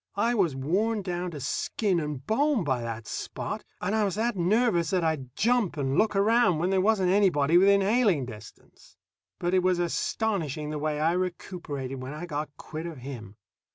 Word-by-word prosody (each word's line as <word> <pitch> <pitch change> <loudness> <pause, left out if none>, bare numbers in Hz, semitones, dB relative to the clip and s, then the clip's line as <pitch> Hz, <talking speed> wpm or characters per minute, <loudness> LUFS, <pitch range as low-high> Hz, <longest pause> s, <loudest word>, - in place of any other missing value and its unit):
I 230 +4 +2
was 180 - +1
worn 200 +11 0
down 180 -1 -3
to 155 -4 -7
skin 190 - -1
and 150 -4 -5
bone 275 -1 +2
by 130 -5 0
that 115 -1 -5
Spot, - - -5 0.2
and 200 - -2
I 220 -1 +2
was 195 -2 -1
that 230 +1 0
nervous 185 -2 +2
that 185 -2 +1
I'd 140 -6 -2
jump 230 -7 +1
and 135 -1 -1
look 215 +3 +2
around 210 -3 +3
when 175 +4 0
there 190 -1 +3
wasn't 195 -3 +2
anybody 175 -6 +3
within 200 +2 +6
hailing 200 - +2
distance. 110 -3 -13 0.4
But 175 +1 -1
it 185 - +4
was 185 0 +2
astonishing 170 -4 -1
the 150 - -3
way 150 0 -1
I 160 +2 +2
recuperated 170 -7 -4
when 130 +3 -6
I 165 +3 -6
got 150 -2 -4
quit 160 +2 -6
of 165 -3 -7
him. 120 -6 -8
175 Hz, 190 wpm, -27 LUFS, 150-200 Hz, 0.4 s, within